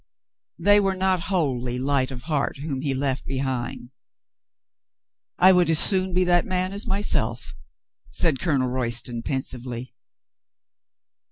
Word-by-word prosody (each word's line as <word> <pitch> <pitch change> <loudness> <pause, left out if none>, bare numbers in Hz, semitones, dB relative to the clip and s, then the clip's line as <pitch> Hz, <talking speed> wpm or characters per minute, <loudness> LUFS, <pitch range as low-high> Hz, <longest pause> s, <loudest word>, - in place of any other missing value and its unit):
They 205 0 +5
were 195 -1 0
not 185 -2 0
wholly 130 -9 -1
light 130 0 0
of 130 -2 -8
heart 150 -3 -2
whom 140 -2 -4
he 140 -2 -1
left 135 -1 -1
behind. 130 -2 -4 1.5
"I 185 +1 +7
would 180 -2 +3
as 160 - +4
soon 190 +2 +4
be 185 - +3
that 175 -1 +3
man 185 +1 -2
as 200 - -5
myself," 125 - 0 0.5
said 155 -6 -1
Colonel 135 -6 0
Royston 120 -1 -1
pensively. 125 -2 -5
140 Hz, 125 wpm, -23 LUFS, 130-180 Hz, 1.5 s, I